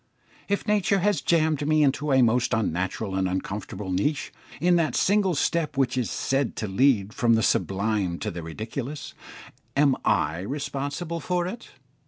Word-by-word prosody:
If 200 Hz, -, 0 dB
nature 205 Hz, -1 st, +2 dB
has 205 Hz, -6 st, +1 dB
jammed 155 Hz, -3 st, +1 dB
me 155 Hz, 0 st, +4 dB
into 145 Hz, +1 st, +1 dB
a 130 Hz, -1 st, +5 dB
most 120 Hz, 0 st, +2 dB
unnatural 95 Hz, -2 st, -2 dB
and 95 Hz, -1 st, 0 dB
uncomfortable 95 Hz, +1 st, -4 dB
niche 140 Hz, +11 st, -1 dB, 0.3 s
in 175 Hz, +3 st, +3 dB
that 165 Hz, -2 st, 0 dB
single 195 Hz, -3 st, +2 dB
step 155 Hz, 0 st, 0 dB
which 130 Hz, -2 st, +1 dB
is 125 Hz, -3 st, -1 dB
said 135 Hz, -1 st, -1 dB
to 110 Hz, -, -3 dB
lead 105 Hz, -1 st, +2 dB
from 115 Hz, -1 st, +3 dB
the 110 Hz, -, +1 dB
sublime 100 Hz, -3 st, 0 dB
to -, -, -4 dB
the 85 Hz, -, -6 dB
ridiculous, 115 Hz, -, -6 dB, 0.6 s
am 140 Hz, -2 st, +4 dB
I 80 Hz, +3 st, +1 dB
responsible 145 Hz, -, -4 dB
for 175 Hz, +2 st, -1 dB
it? 230 Hz, +6 st, -6 dB
135 Hz, 160 wpm, -25 LUFS, 105-155 Hz, 0.6 s, a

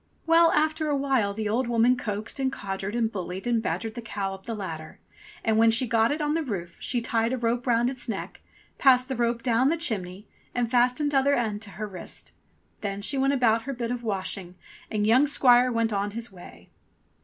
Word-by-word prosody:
Well, 330 Hz, 0 st, +5 dB
after 310 Hz, 0 st, +1 dB
a 290 Hz, -, +2 dB
while 265 Hz, -7 st, +1 dB
the 215 Hz, +1 st, -3 dB
old 235 Hz, +4 st, 0 dB
woman 240 Hz, +1 st, +3 dB
coaxed 215 Hz, +1 st, -4 dB
and 265 Hz, -1 st, 0 dB
codgered 195 Hz, -1 st, -4 dB
and 230 Hz, -2 st, +1 dB
bullied 185 Hz, 0 st, -5 dB
and 235 Hz, -2 st, +1 dB
badgered 225 Hz, 0 st, -3 dB
the 240 Hz, -, -6 dB
cow 200 Hz, -4 st, -4 dB
up 190 Hz, +2 st, -12 dB
the 230 Hz, -, -3 dB
ladder, 160 Hz, -6 st, -7 dB, 0.5 s
and 220 Hz, -1 st, +2 dB
when 230 Hz, 0 st, +6 dB
she 230 Hz, +3 st, +3 dB
got 225 Hz, 0 st, +2 dB
it 300 Hz, +2 st, -2 dB
on 295 Hz, 0 st, 0 dB
to 325 Hz, -, 0 dB
the 275 Hz, -7 st, -5 dB
roof 175 Hz, -3 st, -5 dB
she 245 Hz, -2 st, -1 dB
tied 230 Hz, +1 st, 0 dB
a -, -, 0 dB
rope 240 Hz, +1 st, -1 dB
round 240 Hz, 0 st, +3 dB
its 255 Hz, -2 st, -3 dB
neck, 205 Hz, -, -5 dB, 0.4 s
passed 255 Hz, -1 st, +5 dB
the 265 Hz, -, -2 dB
rope 235 Hz, 0 st, 0 dB
down 245 Hz, +1 st, +3 dB
the 330 Hz, +4 st, +2 dB
chimney, 205 Hz, -, -3 dB, 0.3 s
and 240 Hz, -2 st, 0 dB
fastened 250 Hz, +4 st, +2 dB
tother 280 Hz, 0 st, +3 dB
end 215 Hz, -3 st, -1 dB
to 220 Hz, -, -4 dB
her 215 Hz, -, -3 dB
wrist. 185 Hz, -4 st, -7 dB, 0.5 s
Then 200 Hz, -1 st, -4 dB
she 270 Hz, +5 st, 0 dB
went 270 Hz, +1 st, +2 dB
about 230 Hz, -4 st, +3 dB
her 275 Hz, -, -3 dB
bit 235 Hz, -2 st, -3 dB
of 245 Hz, -1 st, -4 dB
washing, 190 Hz, -3 st, -3 dB, 0.3 s
and 210 Hz, -2 st, 0 dB
young 250 Hz, +7 st, +5 dB
squire 255 Hz, -3 st, +5 dB
he 240 Hz, -, -3 dB
went 225 Hz, -1 st, +1 dB
on 200 Hz, 0 st, 0 dB
his 235 Hz, -1 st, -3 dB
way. 90 Hz, -, -14 dB
230 Hz, 225 wpm, -26 LUFS, 210-255 Hz, 0.5 s, when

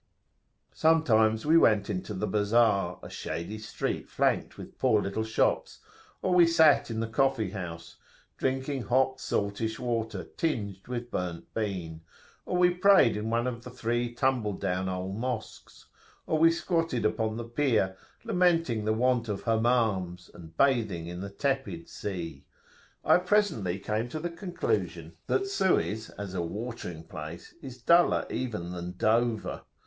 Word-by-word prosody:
Sometimes 110 Hz, -9 st, +3 dB
we 160 Hz, +2 st, +6 dB
went 105 Hz, -7 st, +4 dB
into 105 Hz, +1 st, -4 dB
the 95 Hz, -, -1 dB
Bazar, 105 Hz, -4 st, +2 dB
a -, -, -7 dB
shady 100 Hz, +6 st, -5 dB
street 110 Hz, -1 st, -4 dB
flanked -, -, 0 dB
with -, -, -11 dB
poor 110 Hz, -, +4 dB
little 100 Hz, +2 st, -2 dB
shops, 110 Hz, 0 st, 0 dB, 0.5 s
or 185 Hz, -, +2 dB
we 175 Hz, -2 st, +7 dB
sat 150 Hz, -4 st, +5 dB
in 115 Hz, -1 st, -2 dB
the 115 Hz, -, -1 dB
coffee 115 Hz, -3 st, +1 dB
house,[FN#16] 85 Hz, -3 st, -10 dB
drinking 135 Hz, +1 st, -1 dB
hot 130 Hz, +1 st, +2 dB
saltish 105 Hz, +2 st, -2 dB
water 115 Hz, -3 st, -2 dB
tinged 100 Hz, -, -3 dB
with 120 Hz, -1 st, -5 dB
burnt 90 Hz, -2 st, -4 dB
bean, 90 Hz, -7 st, -3 dB, 0.5 s
or 180 Hz, -, 0 dB
we 180 Hz, 0 st, +5 dB
prayed 180 Hz, -, +5 dB
in 105 Hz, +1 st, -3 dB
one 115 Hz, +1 st, +1 dB
of 120 Hz, -2 st, -3 dB
three 120 Hz, -1 st, -2 dB
tumble 120 Hz, -4 st, 0 dB
down 95 Hz, 0 st, -2 dB
old 95 Hz, +2 st, -4 dB
Mosques, 120 Hz, -1 st, -5 dB, 0.4 s
or 155 Hz, -, 0 dB
we 165 Hz, +1 st, +7 dB
squatted 165 Hz, -, 0 dB
upon 110 Hz, 0 st, 0 dB
the 120 Hz, -, -4 dB
pier, 115 Hz, -6 st, +1 dB, 0.3 s
lamenting 165 Hz, -11 st, +2 dB
the 110 Hz, -, +2 dB
want 120 Hz, 0 st, +1 dB
of 100 Hz, -2 st, -3 dB
Hammams, 110 Hz, -7 st, +1 dB
and 80 Hz, -1 st, -13 dB
bathing 110 Hz, -11 st, +2 dB
in 90 Hz, +1 st, -6 dB
the 100 Hz, -, -5 dB
tepid 100 Hz, -, -2 dB
sea.[FN#17] 85 Hz, -8 st, -6 dB, 0.6 s
I -, -, +6 dB
presently 180 Hz, -, +1 dB
came 105 Hz, +4 st, -2 dB
to 155 Hz, -, -4 dB
the 170 Hz, +2 st, -3 dB
conclusion 180 Hz, -, -3 dB
that 395 Hz, -, +2 dB
[p.174]Suez 190 Hz, -, 0 dB
as 100 Hz, -2 st, -6 dB
a 90 Hz, -, -1 dB
"watering 90 Hz, -2 st, -5 dB
place" 80 Hz, +1 st, -9 dB
is 130 Hz, -3 st, -8 dB
duller 170 Hz, +8 st, +4 dB
even 105 Hz, -9 st, -3 dB
than 90 Hz, 0 st, -5 dB
Dover. 115 Hz, +1 st, +1 dB
110 Hz, 150 wpm, -28 LUFS, 100-135 Hz, 0.6 s, we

